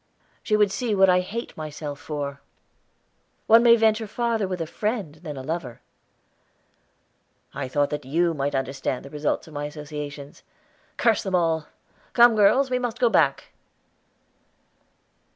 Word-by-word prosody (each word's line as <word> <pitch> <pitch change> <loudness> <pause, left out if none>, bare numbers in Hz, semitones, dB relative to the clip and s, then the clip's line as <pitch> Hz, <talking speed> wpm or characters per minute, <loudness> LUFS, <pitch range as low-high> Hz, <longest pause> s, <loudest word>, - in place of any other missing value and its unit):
"She 215 - +1
would 210 -2 +3
see 215 +2 -1
what 190 -1 +5
I 180 - +4
hate 220 +6 -5
myself 150 -2 -6
for." 140 -2 -5 1.0
"One 225 +1 +7
may 235 -1 +7
venture 220 -1 +2
farther 230 -2 -1
with 185 -1 -4
a 165 - -2
friend 210 -2 -3
than 150 -5 -7
a 130 - -6
lover." 150 -5 -5 1.7
"I 130 - -4
thought 145 +2 0
that 150 0 -3
you 165 +6 +1
might 140 -1 -2
understand 135 -1 -3
the 140 - -11
results 150 +1 -2
of 160 - -13
my 145 0 -4
associations. 150 -1 -8 0.6
Curse 230 -2 +3
them 190 -2 -2
all! 165 -3 +1 0.5
Come, 240 -1 +6
girls, 255 +6 +4
we 250 - +1
must 245 -2 -3
go 240 - +3
back." - - +1
170 Hz, 150 wpm, -24 LUFS, 145-220 Hz, 1.7 s, One